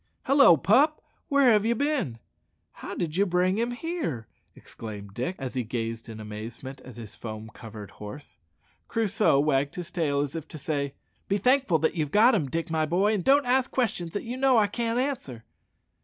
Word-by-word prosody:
"Hallo, 275 - +6
pup! 280 - +4 0.3
where 280 -4 +5
have 210 -2 +4
ye 230 +2 +2
bin? 275 - -1 0.5
How - - -8
did 165 -3 -3
ye 200 - +5
bring 185 +1 +1
him 235 +1 0
here?" 245 - -4 0.3
exclaimed 100 -3 -9
Dick, 130 - -3
as 130 -2 -5
he 130 -2 -1
gazed 115 0 -4
in 110 -1 -8
amazement 110 +5 -8
at 125 -3 -12
his 115 -2 -9
foam 110 -1 -8
covered 110 -3 -10
horse. 115 +4 -10 0.5
Crusoe 215 -9 +2
wagged 140 -1 +1
his 175 -2 -6
tail, 145 -5 0
as 145 +1 -3
if 160 -1 -5
to - - -9
say, 140 -2 -3 0.3
"Be 200 - +1
thankful 250 -4 +3
that 160 +1 +1
you've 155 -4 -1
got 220 - +5
him, 160 -11 0
Dick, 165 +3 -3
my 160 -1 +1
boy, 190 +6 +2
and 200 -4 -1
don't 280 +1 +4
ask 255 +1 +2
questions 200 -10 -1
that 205 - -3
you 245 +2 -5
know 265 -2 +4
I 215 - +5
can't 230 +3 -2
answer." 245 - -3
165 Hz, 190 wpm, -27 LUFS, -, 0.5 s, Hallo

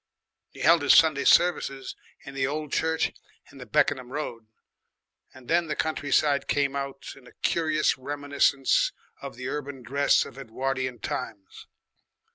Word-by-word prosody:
He - - -13
held 165 0 +5
his 145 - +5
Sunday 155 -3 +4
services 140 -6 +2 0.3
in 140 - -9
the 135 -1 0
old 150 0 -4
church 160 0 0 0.4
in 135 - -14
the 125 - -10
Beckenham 140 -4 +1
Road, 115 -6 -5 0.8
and 130 -2 -16
then 170 0 +2
the 150 - -2
countryside 145 -2 0
came 140 -1 0
out 140 -1 -5
in 135 -2 -17
a - - -15
curious 155 -5 +1
reminiscence 145 0 +1 0.3
of - - -8
the 125 +1 -6
urban 140 -2 -5
dress 140 +4 +2
of 135 - -11
Edwardian 130 0 -3
times. 100 -2 -7
140 Hz, 145 wpm, -26 LUFS, 130-150 Hz, 0.8 s, held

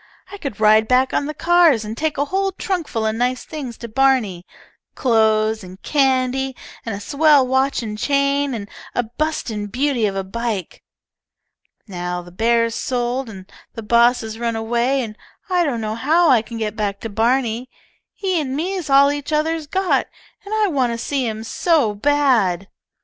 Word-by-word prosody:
I 405 - -8
could 275 - -6
ride 215 +1 +5
back 255 +2 +2
on 285 - 0
the 305 - -4
cars 335 -9 +4
and 215 +1 -5
take 310 +3 -2
a 285 - +1
whole 385 +5 -1
trunk 370 -4 -3
full 225 -1 -2
of 220 - +1
nice 250 +2 -1
things 270 -7 -7
to 235 - -7
Barney, 225 -7 +1 0.5
clothes, 220 -2 +2
and 185 +1 -11
candy, 265 -2 +1 0.3
and 225 -3 -4
a - - -6
swell 285 +4 +4
watch 265 0 +1
and 210 -1 -5
chain, 280 0 +1
and 205 -3 -6 0.3
a 245 - +1
bustin' 230 -4 -3
beauty 250 0 0
of 195 - -3
a 195 - -2
bike. 210 -2 -4 1.1
Now 180 -2 -4
the 175 - -14
bear's 230 +4 +1
sold 245 +1 -2
and 190 -3 -10 0.3
the 225 - -6
boss 235 +3 +4
has 220 0 -7
run 235 -1 -1
away, 240 +4 0
and 215 -2 -7 0.4
I 355 -1 +3
don't 260 -8 -1
know 215 0 -2
how 310 +7 +3
I 240 -4 +5
can 230 +1 -8
get 215 -1 -3
back 205 -2 -2
to - - -4
Barney. 235 +2 0 0.5
Him 375 -4 0
an 260 - -3
me's 350 +1 -3
all 280 +1 +6
each 290 +1 -5
other's 310 0 0
got, 380 +4 +1 0.4
and 400 - -10
I 435 -1 +2
want 265 -8 +1
to - - -3
see 265 +1 -2
him 220 0 -4
so 285 -3 +1
bad." 220 -7 +1
245 Hz, 180 wpm, -20 LUFS, 220-285 Hz, 1.1 s, all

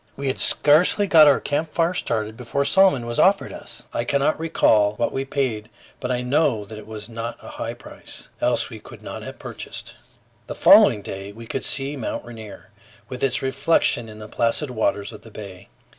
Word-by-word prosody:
We 140 0 -2
had 130 - -2
scarcely 165 +7 +4
got 160 -5 +7
our 140 - +5
camp 155 +2 -2
fire 170 +1 +1
started 110 - -2
before 125 +4 -2
a - - -5
salmon 165 -6 +4
was 120 0 -3
offered 195 +1 +3
us; - - -9
I 120 - -1
cannot 140 +5 +1
recall 110 -10 +3
what 120 +2 -1
we 135 0 -3
paid, 125 -7 -2 0.3
but 125 - -4
I 125 -1 0
know 125 -5 +1
it 110 0 -10
was 105 -1 -8
not 115 0 -5
a - - -11
high - - -5
price, - - -10
else - - +1
we - - -8
could - - -14
not - - -7
have - - -8
purchased. - - -8 0.5
The - - -5
following 105 - +6
day 95 +1 -6
we 115 +3 -11
could 130 - -4
see 135 +1 0
Mt. 130 - -4
Rainier, 110 -3 -11 0.4
with 125 0 -6
its 135 -1 +1
reflection 130 -3 +1
in 105 - -11
the 105 0 -9
placid 120 +6 0
waters 110 -2 -1
of 105 - -11
the 115 - -14
bay. 100 -3 -10
120 Hz, 200 wpm, -23 LUFS, 110-145 Hz, 0.5 s, got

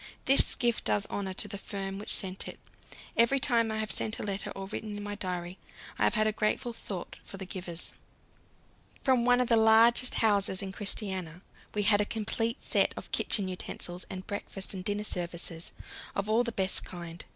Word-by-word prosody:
This 270 +1 +5
gift 240 -1 +1
does 105 -1 +2
honour 190 -2 -3
to - - -1
the 200 - -6
firm 195 -1 -5
which 210 - +1
sent 190 -1 0
it; - - -7 0.6
every 235 +4 +4
time 235 -4 +2
I 220 - -2
have 220 0 -1
sent 220 - 0
a - - -3
letter 200 -1 0
or 195 - -5
written 210 +1 -5
in 205 - -5
my 205 0 -4
diary, 180 -2 -4 0.4
I - - +4
have - - +2
had 215 -1 +3
a 215 - +3
grateful 215 +3 -1
thought 190 -5 -6
for 195 - -8
the 190 - -5
givers. 180 -2 -3 1.1
From 255 -3 +3
one 245 0 +5
of 250 - +2
the 230 - +4
largest 225 +3 +6
houses 200 -3 +2
in 190 - -4
Christiania 190 -4 0 0.3
we 205 - +1
had 205 0 +4
a - - +1
complete 225 +2 -2
set - - +2
of - - -8
kitchen 200 -3 +2
utensils 180 -1 -5
and 185 0 -6
breakfast 200 -1 -4
and 185 -1 -6
dinner 205 +2 -1
services, 170 -3 -3 0.4
all 215 +3 +1
of 245 - +2
the - - -1
best 190 -3 +2
kind. 170 -1 -8
205 Hz, 195 wpm, -30 LUFS, 185-220 Hz, 1.1 s, largest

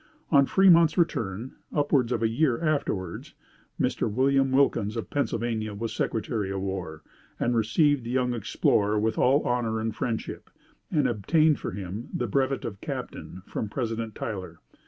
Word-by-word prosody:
On 140 -3 +5
Fremont's 170 -4 +5
return, 115 - -1
upwards 140 -5 +1
of 115 -2 0
a - - +4
year 120 +2 +1
afterwards, 140 - -2 0.4
Mr. - - 0
William 135 +3 +2
Wilkins, 120 -5 +2
of 115 - -5
Pennsylvania, 115 -6 -1
was 115 +2 -4
Secretary 110 -2 -2
of 95 0 -2
War, 90 -5 -5 0.4
and 120 0 +1
received 130 +5 +2
the 115 - -6
young 125 0 +1
explorer 105 -1 +1
with 110 +1 0
all 135 +4 +4
honor 120 -2 0
and 110 0 -3
friendship, 115 -3 -4 0.4
and 150 -6 +2
obtained 150 - +2
for - - -4
him 100 +4 -6
the 125 - -1
brevet 135 +4 0
of 100 -4 -6
captain 90 +1 -6
from 110 - -4
President 115 -2 -3
Tyler. 95 -6 -5
115 Hz, 155 wpm, -27 LUFS, 105-135 Hz, 0.4 s, On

